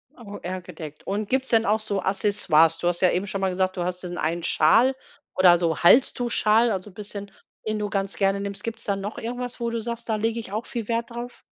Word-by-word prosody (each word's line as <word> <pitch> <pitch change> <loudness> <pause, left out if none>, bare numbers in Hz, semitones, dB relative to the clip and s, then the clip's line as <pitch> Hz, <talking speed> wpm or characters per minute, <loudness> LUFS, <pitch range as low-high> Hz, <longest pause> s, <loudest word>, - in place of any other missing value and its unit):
Au 205 -4 -9
eher 185 +1 -5
gedeckt. 155 -4 -10
Und 205 +1 -2
gibt's 265 0 +1
denn 225 -1 +3
auch 215 +1 +2
so 205 -2 -2
Accessoires? 190 -5 +3
Du 175 - -2
hast 175 0 0
ja 185 - +5
eben 185 +3 0
schon 195 -1 -4
mal 190 - +2
gesagt, 185 0 -1
du 175 - -1
hast 180 +1 -4
diesen 175 -1 -5
einen 165 +2 -1
Schal 230 +16 +4 0.4
oder 180 -2 +6
so 170 -2 0
Halstuch-Schal, 235 +1 +4
also 195 0 -4
bisschen 200 0 -8 0.4
den 215 0 -1
du 210 0 -2
ganz 195 0 -2
gerne 195 0 +2
nimmst. 200 0 -5
Gibt's 230 0 -5
da 200 - 0
noch 200 +2 -5
irgendwas, 245 +2 -5
wo 235 -1 -1
du 230 0 -2
sagst, 235 +1 -5
da 220 - +2
lege 225 +2 -1
ich 220 - -8
auch 215 +3 -3
viel 230 -3 -5
Wert 230 +1 -1
drauf? 240 +1 -7
205 Hz, 235 wpm, -24 LUFS, 185-230 Hz, 0.4 s, oder